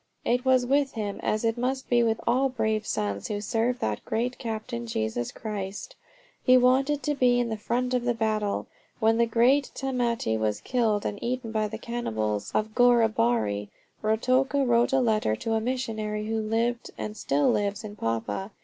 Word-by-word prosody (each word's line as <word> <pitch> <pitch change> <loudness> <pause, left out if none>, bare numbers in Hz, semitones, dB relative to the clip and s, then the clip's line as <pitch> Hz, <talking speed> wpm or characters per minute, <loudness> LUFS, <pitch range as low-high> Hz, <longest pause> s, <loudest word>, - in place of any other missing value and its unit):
It 245 +1 +1
was 260 -1 +3
with 275 +1 +2
him 205 -3 -4
as 215 +2 0
it 225 +1 0
must 260 +2 -1
be 240 -1 +3
with 225 -1 +1
all 260 +3 +2
brave 220 -3 -1
sons 100 -1 -2
who 205 - -2
serve 230 +4 0
that 105 -1 -2
great 245 +3 -2
Captain, 215 - -4
Jesus 110 +2 -2
Christ: 205 - -6 0.5
he 255 -1 +6
wanted 270 +3 +3
to 295 - +1
be 250 -3 +3
in 240 -1 0
the 220 - -1
front 245 +4 -1
of 250 -1 +1
the 240 -1 +1
battle. 215 -2 -1 0.3
When 225 0 +3
the 235 - +4
great 250 +5 +3
Tamate 240 - -1
was 105 -1 0
killed 225 -5 0
and 205 - -3
eaten 245 -1 -3
by 215 -1 0
the 220 +1 -6
cannibals 110 - -3
of 215 0 0
Goaribari, 120 - +2 0.3
Ruatoka 255 +6 +2
wrote 235 0 +3
a 265 - +3
letter 215 - +1
to 225 - -3
a 220 - +1
missionary 220 -4 -2
who 220 0 -1
lived 230 +2 -1
and 215 - -5
still 145 -7 +1
lives 205 0 -1
in 210 -1 -7
Papua. 115 - -2
225 Hz, 180 wpm, -27 LUFS, 205-250 Hz, 0.5 s, he